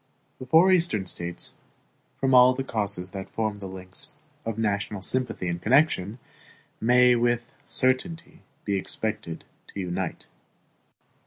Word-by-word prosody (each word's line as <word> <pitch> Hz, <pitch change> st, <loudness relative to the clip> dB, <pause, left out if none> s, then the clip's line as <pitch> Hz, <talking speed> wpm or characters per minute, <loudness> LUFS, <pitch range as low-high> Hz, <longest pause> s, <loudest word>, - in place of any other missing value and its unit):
The 130 Hz, -, -8 dB
four 165 Hz, +7 st, +6 dB
Eastern 165 Hz, -, +2 dB
States, 85 Hz, -1 st, -5 dB, 0.6 s
from 135 Hz, -1 st, +1 dB
all 125 Hz, 0 st, +7 dB
the 135 Hz, -, -2 dB
causes 100 Hz, -7 st, -3 dB
that 95 Hz, -1 st, -7 dB
form 110 Hz, -2 st, -2 dB
the 100 Hz, -, -6 dB
links 95 Hz, +10 st, -3 dB, 0.3 s
of 115 Hz, -1 st, -3 dB
national 105 Hz, -2 st, -1 dB
sympathy 125 Hz, -7 st, -1 dB
and 85 Hz, 0 st, -3 dB
connection, 115 Hz, -, +2 dB, 0.6 s
may 125 Hz, +1 st, +5 dB
with 120 Hz, 0 st, +1 dB, 0.2 s
certainty 160 Hz, +7 st, 0 dB, 0.3 s
be 100 Hz, -1 st, 0 dB
expected 95 Hz, -4 st, -4 dB, 0.2 s
to -, -, -8 dB
unite. 90 Hz, 0 st, -3 dB
110 Hz, 130 wpm, -26 LUFS, 95-130 Hz, 0.6 s, all